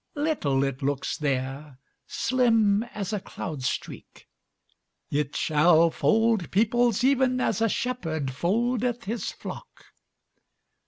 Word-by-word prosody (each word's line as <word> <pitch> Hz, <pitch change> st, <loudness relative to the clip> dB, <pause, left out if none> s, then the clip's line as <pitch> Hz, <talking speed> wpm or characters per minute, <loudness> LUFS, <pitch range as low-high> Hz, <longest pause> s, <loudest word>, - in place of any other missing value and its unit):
Little 285 Hz, -, 0 dB
it 135 Hz, 0 st, -3 dB
looks 140 Hz, 0 st, -1 dB
there, 135 Hz, 0 st, -3 dB, 0.3 s
Slim 225 Hz, -5 st, +2 dB
as 215 Hz, -4 st, -5 dB
a 210 Hz, -, 0 dB
cloud 155 Hz, -6 st, -7 dB
streak; 130 Hz, -, -5 dB, 0.8 s
It 145 Hz, 0 st, -1 dB
shall 160 Hz, +2 st, +4 dB
fold 225 Hz, -3 st, +2 dB
peoplesEven 245 Hz, +4 st, +2 dB
as 225 Hz, -4 st, 0 dB
a -, -, +4 dB
shepherdFoldeth 230 Hz, -, -1 dB
his 225 Hz, +3 st, -3 dB
flock. -, -, -11 dB
200 Hz, 100 wpm, -26 LUFS, 150-240 Hz, 0.8 s, shall